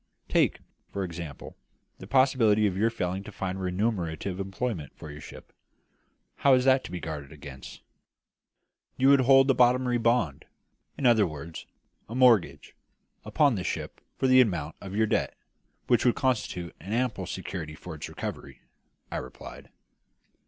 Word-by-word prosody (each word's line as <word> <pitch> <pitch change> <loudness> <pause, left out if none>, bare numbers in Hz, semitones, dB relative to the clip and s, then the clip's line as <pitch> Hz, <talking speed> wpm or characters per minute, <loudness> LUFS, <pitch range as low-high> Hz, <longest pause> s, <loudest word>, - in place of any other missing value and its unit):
Take, - - +2 0.3
for 100 - -3
example, 85 -5 -7 0.4
the 95 - -10
possibility 115 -4 +4
of 95 -3 0
your 110 +4 +2
failing 95 -4 -3
to 105 - -10
find 95 -1 -4
remunerative 90 -2 -2
employment 95 - -4
for 75 - -9
your 75 +1 -10
ship. - - -12 0.8
How 140 -2 +5
is 125 0 +1
that 130 0 +4
to - - -8
be 90 - -4
guarded 75 -4 -6
against?" 70 -3 -11 1.1
"You 135 +1 +4
would 140 -1 +6
hold 135 +1 +6
a - - +3
bottomry 125 0 +3
bond 115 - +1 0.5
in 140 - -3
other 110 -5 +5
words, 80 +1 -8 0.4
a 115 - -6
mortgage 110 - +3 0.5
upon 145 -3 +2
the 95 -5 -3
ship - - -4 0.2
for - - -1
the 130 0 +7
amount 85 -10 -1
of 95 0 -7
your 110 +1 +3
debt, 105 - -1 0.5
which 120 -2 +3
would 120 - +3
constitute 105 -9 -2
an 95 +7 -6
ample 115 -6 -1
security 90 -4 -6
for 90 +2 -9
its 75 - -7
recovery," - - -7 0.5
I - - -2
replied. - - -9
100 Hz, 155 wpm, -27 LUFS, 85-125 Hz, 1.1 s, the